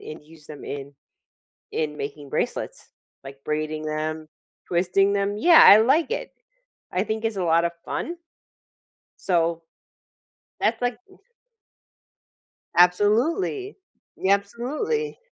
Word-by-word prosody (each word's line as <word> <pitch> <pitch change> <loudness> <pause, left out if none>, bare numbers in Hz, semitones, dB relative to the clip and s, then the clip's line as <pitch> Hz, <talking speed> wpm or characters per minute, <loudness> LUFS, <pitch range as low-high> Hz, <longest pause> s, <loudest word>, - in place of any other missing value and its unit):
and 155 -1 -10
use 155 -1 -18
them 150 -2 -10
in 140 0 -7 0.8
in 150 -1 -2
making 145 0 -7
bracelets, - - -4 0.3
like, 135 0 -10
braiding 155 0 -3
them, 155 +1 -3 0.4
twisting 185 +3 +2
them 200 0 -1
yeah, 335 +5 +7
I 205 - +10
like 275 - +3
it. - - -4 0.6
I 185 +2 0
think 220 +1 -4
it's 225 -2 -1
a 185 - -1
lotta 170 +1 +2
fun 345 - -4 1.1
so, 170 -2 +1 1.0
that's 225 +2 +1
like 245 0 -1 1.8
Absolutely, 235 - +2 0.4
y 190 - -2
absolutely. 260 - -2
190 Hz, 110 wpm, -24 LUFS, 155-235 Hz, 1.8 s, I